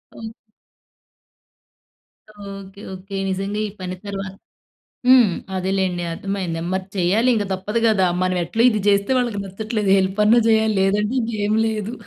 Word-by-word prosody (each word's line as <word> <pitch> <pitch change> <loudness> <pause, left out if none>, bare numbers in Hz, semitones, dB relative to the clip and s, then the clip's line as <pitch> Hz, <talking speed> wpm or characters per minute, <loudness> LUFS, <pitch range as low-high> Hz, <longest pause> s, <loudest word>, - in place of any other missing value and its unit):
Okay. 225 - -7 2.3
Okay. 195 0 -11
Okay. 195 +1 -7
నిజంగా 195 +2 -2
ఈ - - -7
పని 185 0 -4
తర్వాత 195 -1 -5 0.7
హ్మ్. 255 -3 +7 0.3
అదేలేండి 185 -1 -1
అర్థమైంది 185 -3 -4
మరి 190 0 -2
చేయాలి 195 +7 +2
ఇంక 210 - 0
తప్పదు 205 +5 -2
కదా. 200 -4 +3 0.2
మనం 185 0 0
ఎట్లో 220 +7 -2
ఇది 215 -3 -1
చేస్తే 200 +5 +2
వాళ్ళకి 240 -5 -1
నచ్చట్లేదు 210 +1 -2
హెల్ప్ 190 +2 -1
అన్నా 230 +3 +6
చేయాలి 220 -1 +3
లేదంటే 210 +4 +1
ఇంకేం 215 -2 -1
లేదు. 220 0 -3
200 Hz, 135 wpm, -21 LUFS, 190-220 Hz, 2.3 s, హ్మ్